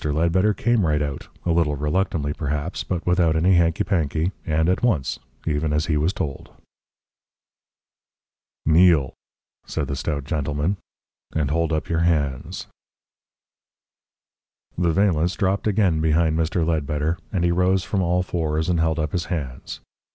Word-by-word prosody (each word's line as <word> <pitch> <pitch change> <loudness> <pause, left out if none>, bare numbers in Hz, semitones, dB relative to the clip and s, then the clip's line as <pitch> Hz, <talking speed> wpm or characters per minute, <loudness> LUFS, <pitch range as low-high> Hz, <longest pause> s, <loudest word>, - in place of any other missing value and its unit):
Ledbetter 85 +7 +2
came 120 +1 +2
right 75 -3 +2
out, 70 -2 -4 0.2
a 85 - +1
little 80 -3 +2
reluctantly 75 0 -1
perhaps, 75 +3 -3
but 90 -3 -3
without 90 -3 +3
any 90 +4 +3
hanky 85 -2 +3
panky, 80 -2 0 0.2
and 80 0 +1
at 90 - +1
once, 100 - 0 0.3
even 75 -1 0
as 75 +1 +1
he 75 - 0
was 75 +4 +2
told. 70 -7 -5 2.2
"Kneel," 80 -4 +4 0.5
said - - -2
the 70 - -3
stout 70 0 -3
gentleman, 75 +4 -1 0.6
"and 75 -3 0
hold 80 +1 +1
up 80 -1 -1
your 85 - 0
hands." 75 -6 -1 2.1
The 85 0 +1
valance 90 -2 +2
dropped 100 +1 0
again 95 -6 +2
behind 80 0 +2
Mr. 80 +1 0
Ledbetter, 75 0 -1
and 95 -4 0
he 85 - +3
rose 90 +1 +2
from 100 - -1
all 90 +1 +1
fours 80 -2 -1
and 85 -2 +1
held 80 -1 +1
up 75 -2 -1
his 90 -2 -2
hands. 70 -8 -5
80 Hz, 145 wpm, -23 LUFS, 75-90 Hz, 2.2 s, Kneel